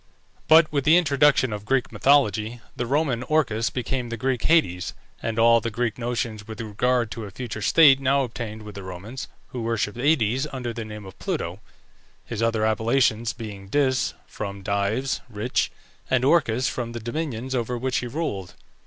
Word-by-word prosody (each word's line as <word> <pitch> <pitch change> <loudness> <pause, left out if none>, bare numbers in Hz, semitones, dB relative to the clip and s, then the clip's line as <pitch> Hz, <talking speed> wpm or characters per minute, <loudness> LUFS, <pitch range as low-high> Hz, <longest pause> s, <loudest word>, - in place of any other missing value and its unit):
But 160 0 +6
with 140 -2 +1
the 155 +5 +6
introduction 145 -6 +3
of 105 -1 -5
Greek 130 +3 0
mythology, 120 -5 +2 0.2
the 120 - -3
Roman 135 -3 +1
Orcus 130 -6 +1
became 125 0 -3
the 115 - -4
Greek 130 +1 -1
Hades, 90 - +2 0.3
and 115 0 -3
all 115 0 +5
the 115 - -2
Greek 115 +1 -2
notions 115 -3 -3
with 110 -1 -8
regard 115 +1 0
to 110 0 -5
a - - -7
future 110 +1 -6
state 135 +4 +6
now 135 +1 +2
obtained 110 -3 -6
with 105 -1 -9
the 100 - -7
Romans, 95 +7 -7 0.2
who 125 - -5
worshipped 115 -1 -1
Aïdes 130 -1 +2
under 125 -3 -4
the 115 - -5
name 105 -1 -8
of 95 - -12
Pluto, 85 +4 -3 0.7
his - - -4
other 115 -1 +1
appellations 115 +1 +2
being 105 -4 -8
Dis 130 +3 +1
(from 100 -2 -6
dives, 100 +7 0
rich) 110 +2 -1 0.4
and 130 -1 +2
Orcus 130 -5 +3
from 120 -2 -3
the 120 - -4
dominions 130 0 -4
over 125 -1 -1
which 130 +1 -1
he 125 - -2
ruled. 115 - -4
120 Hz, 175 wpm, -24 LUFS, 110-130 Hz, 0.7 s, But